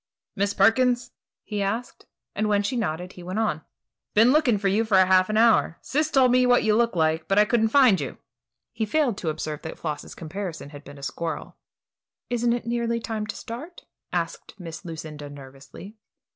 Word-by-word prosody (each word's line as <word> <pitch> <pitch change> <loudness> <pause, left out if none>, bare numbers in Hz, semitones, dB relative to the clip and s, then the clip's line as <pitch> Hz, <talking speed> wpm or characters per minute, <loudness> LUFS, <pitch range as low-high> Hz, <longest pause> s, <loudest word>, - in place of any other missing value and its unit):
"Miss 200 +1 0
Perkins?" 245 +4 +3 0.3
he 210 -2 -4
asked, 220 +5 -3 0.3
and 215 0 -1
when 205 -1 +2
she 255 +6 -2
nodded, 180 -5 -3
he 180 - -12
went 185 +3 -5
on: 215 -8 0 0.5
"Been 225 +4 +6
looking 275 -7 +3
for 200 0 -1
you 205 +4 +2
for 215 -4 +3
half 185 0 +5
an 215 - 0
hour. 225 -7 +4
Sis 300 +3 0
told 265 -4 +4
me 250 0 +4
what 245 0 +4
you 215 -1 +3
looked 235 -2 +2
like, 160 0 +1
but 195 - +1
I 210 - +6
couldn't 225 +1 +2
find 225 - +5
you." 140 - -5 0.5
He 225 - -3
failed 255 +1 +1
to 165 - -2
observe 155 -1 -4
that 160 - -7
Floss's 155 -3 -5
comparison 170 -2 -6
had 145 -1 -11
been 145 0 -12
a 140 - -12
squirrel. 160 +2 -5 0.8
"Isn't 240 0 +1
it 240 -1 -3
nearly 235 0 -1
time 220 -2 -4
to - - -5
start?" 280 +10 -8 0.3
asked - - -4
Miss 165 -3 -8
Lucinda, 155 -3 -8
nervously. 140 +8 -12
210 Hz, 190 wpm, -25 LUFS, 165-235 Hz, 0.8 s, Been